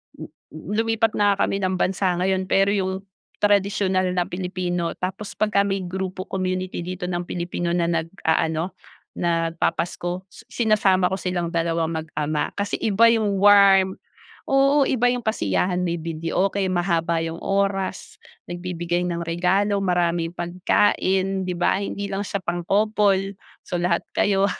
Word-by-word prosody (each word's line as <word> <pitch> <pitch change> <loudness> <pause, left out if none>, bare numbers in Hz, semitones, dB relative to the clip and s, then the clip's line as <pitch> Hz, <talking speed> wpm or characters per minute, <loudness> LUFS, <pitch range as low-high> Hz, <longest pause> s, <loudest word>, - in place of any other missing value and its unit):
n - - -10
n 155 +5 -12
lumipat 225 +1 +1
na 205 -1 +2
nga - - +1
kami 195 - 0
ng 185 -1 0
bansa 185 0 0
ngayon 185 +1 0
pero 195 +1 +3
yung 190 -1 -1 0.4
tradisyonal 195 -2 +2
na 180 - +2
Pilipino 180 -1 -3
tapos 190 +3 -5
pagka 200 -2 +2
may 195 -1 -1
grupo 185 +1 -4
community 185 -1 -3
dito 180 +1 -5
ng 175 -1 -3
Pilipino 175 0 -2
na 175 - +1 0.2
nag-aano 160 0 -1 0.5
nagpapasko 170 +1 -1
su 235 - -15
sinasama 210 -6 +2
ko 190 - +1
silang 180 -2 -2
dalawang 165 -1 0 0.2
mag-ama. 150 -1 -2
Kasi 205 0 -2
iba 225 +2 +5
yung 215 -3 +1
warm 195 -1 +6 0.5
oo, 275 +1 +4
iba 245 -1 +2
yung 245 -1 -2
kasiyahan, 180 - 0
may 170 -1 -1
videoke 165 +5 -1
mahaba 170 -2 0
yung 165 0 -5
oras, 195 -1 -2 0.2
nagbibigay 175 0 -3
ng 170 -1 -2
regalo 190 +4 +1
maraming 175 -2 +1
pagkain, 190 +2 +1
'di 180 - -2
ba? 190 +3 +1
Hindi 200 0 -4
lang 195 +1 -2
siya 200 - -2
pang-couple, 195 +2 +1 0.3
so, 175 -2 -3
lahat 175 -1 0
kayo 195 -1 +2
185 Hz, 140 wpm, -23 LUFS, 175-200 Hz, 0.5 s, warm